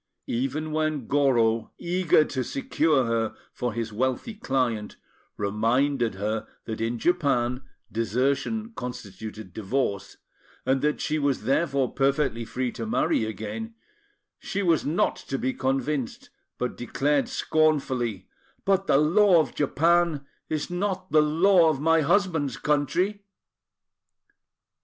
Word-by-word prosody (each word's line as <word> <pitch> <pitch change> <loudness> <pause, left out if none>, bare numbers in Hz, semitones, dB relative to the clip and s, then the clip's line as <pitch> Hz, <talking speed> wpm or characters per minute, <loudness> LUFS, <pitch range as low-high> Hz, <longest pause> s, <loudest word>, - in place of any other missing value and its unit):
Even 135 +6 -2
when 155 -4 -1
Goro, 115 -6 +2
eager 175 -3 +3
to 130 -3 -3
secure 140 +2 +1
her 115 -1 -1 0.2
for 125 -1 -2
his 115 -1 -4
wealthy 130 - -1
client, 125 - -1 0.4
reminded 115 +4 +1
her 105 +2 -2 0.2
that 110 -1 -5
in 115 +1 -1
Japan 130 -6 +1 0.3
desertion 135 - -1
constituted 110 -4 -7
divorce, 100 -1 -2 0.5
and 130 +1 +2
that 150 0 0
she 155 0 0
was 140 -5 0
therefore 135 0 +1
perfectly 135 -4 +1
free 125 +2 -2
to 115 -1 -5
marry 110 - +1
again, 110 - -5 0.6
she 200 0 -3
was 170 -4 +3
not 155 +4 +1
to 135 - -4
be 130 0 -1
convinced, 135 -1 -2 0.3
but 125 - -2
declared 140 +4 0
scornfully: 135 - 0 0.4
"But 195 0 +2
the - - +5
law 175 +5 +5
of 155 - 0
Japan 160 +1 +2 0.2
is 155 +2 -2
not 185 +1 -2
the 155 - +6
law 165 +3 +4
of 145 -4 -1
my 165 +2 +3
husband's 160 -6 +1
country!" 150 +8 0
135 Hz, 125 wpm, -26 LUFS, 115-155 Hz, 0.6 s, the